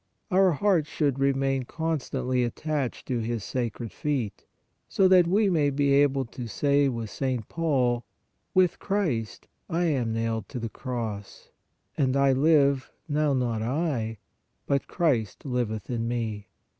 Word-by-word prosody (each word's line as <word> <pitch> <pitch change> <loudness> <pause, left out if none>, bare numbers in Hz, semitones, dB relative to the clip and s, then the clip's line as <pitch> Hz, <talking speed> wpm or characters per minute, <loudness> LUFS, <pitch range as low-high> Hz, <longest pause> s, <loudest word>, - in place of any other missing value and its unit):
Our 185 -1 +5
hearts 170 -2 +2
should 140 -4 0
remain 135 -1 +1
constantly 130 -5 -1
attached 140 +2 -2
to 125 -2 -1
His 115 -1 -2
sacred 120 -2 -3
feet, 135 -8 -3 0.4
so 195 - +4
that 185 -2 +6
we 205 +4 +3
may 155 -6 +2
be 140 0 +2
able 140 -1 +3
to 120 +1 -7
say 140 +4 +2
with 115 -4 -4
St. 130 -5 -2
Paul: 130 -7 +1 0.3
" - - -48
With 185 -2 +3
Christ 160 - -2 0.2
I 170 0 0
am 135 -9 +1
nailed 115 0 -2
to 125 - -5
the 115 -1 -4
cross; 115 -5 -6 0.5
and 135 -1 +2
I 140 -1 +4
live, 140 -1 +3 0.2
now 150 -1 +1
not 120 -4 0
I, 120 -3 -1 0.5
but 140 -1 0
Christ 130 - 0
liveth 120 -5 -2
in 115 -2 -2
me. 110 -4 -3
135 Hz, 145 wpm, -27 LUFS, 120-150 Hz, 0.5 s, that